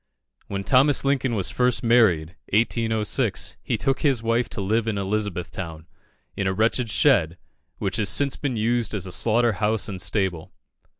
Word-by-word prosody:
When 100 Hz, 0 st, -4 dB
Thomas 135 Hz, +5 st, +3 dB
Lincoln 135 Hz, -3 st, 0 dB
was 95 Hz, -4 st, 0 dB
first 125 Hz, -1 st, +1 dB
married 110 Hz, -10 st, +3 dB, 0.2 s
(1806), 110 Hz, 0 st, 0 dB
he -, -, -2 dB
took 135 Hz, -, 0 dB
his 135 Hz, -7 st, +1 dB
wife 115 Hz, +1 st, 0 dB
to -, -, -7 dB
live 110 Hz, +4 st, 0 dB
in 110 Hz, -2 st, -1 dB
Elizabethtown, 95 Hz, -5 st, -4 dB, 0.5 s
in 100 Hz, -, -2 dB
a 95 Hz, -, 0 dB
wretched 115 Hz, +3 st, 0 dB
shed, 90 Hz, -4 st, +3 dB, 0.4 s
which -, -, -3 dB
has 105 Hz, -3 st, 0 dB
since 140 Hz, -1 st, +2 dB
been 135 Hz, -5 st, -3 dB
used 115 Hz, 0 st, 0 dB
as 95 Hz, -3 st, -3 dB
a 95 Hz, -, -7 dB
slaughter 115 Hz, +4 st, +2 dB
house 105 Hz, +1 st, 0 dB
and 95 Hz, -3 st, -4 dB
stable. 95 Hz, -4 st, 0 dB
110 Hz, 165 wpm, -23 LUFS, 95-120 Hz, 0.5 s, Thomas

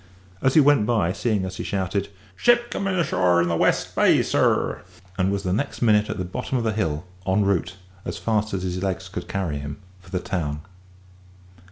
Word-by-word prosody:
As 130 Hz, -, +2 dB
he -, -, +8 dB
went 140 Hz, -7 st, +4 dB
by, 105 Hz, -7 st, +1 dB
seeing 105 Hz, -4 st, 0 dB
us, 95 Hz, 0 st, -6 dB
he -, -, -4 dB
shouted, 100 Hz, 0 st, -2 dB, 0.3 s
"Ship 240 Hz, -, +3 dB
coming 195 Hz, -1 st, -1 dB
ashore 90 Hz, -, +2 dB
in 85 Hz, -, +2 dB
the 85 Hz, -, +1 dB
West -, -, +1 dB
Bay, -, -, +4 dB
sir!" -, -, +1 dB, 0.3 s
and 95 Hz, +1 st, +1 dB
was 100 Hz, 0 st, -2 dB
the 90 Hz, -2 st, 0 dB
next 130 Hz, +4 st, -2 dB
minute 105 Hz, -2 st, +4 dB
at -, -, -3 dB
the 95 Hz, -, -3 dB
bottom 125 Hz, +8 st, -3 dB
of 120 Hz, -, -1 dB
the 110 Hz, -, +1 dB
hill, 80 Hz, -6 st, -2 dB, 0.2 s
en 100 Hz, +2 st, +2 dB
route, 90 Hz, -2 st, 0 dB, 0.3 s
as -, -, -5 dB
fast 110 Hz, -1 st, 0 dB
as 95 Hz, -, -3 dB
his 90 Hz, 0 st, -3 dB
legs 95 Hz, -1 st, -2 dB
could 95 Hz, -, -6 dB
carry 90 Hz, -7 st, -2 dB
him, 70 Hz, +1 st, -6 dB, 0.2 s
for 90 Hz, -1 st, -18 dB
the 95 Hz, -, -2 dB
town. 75 Hz, -5 st, -3 dB
95 Hz, 205 wpm, -24 LUFS, 90-110 Hz, 0.3 s, he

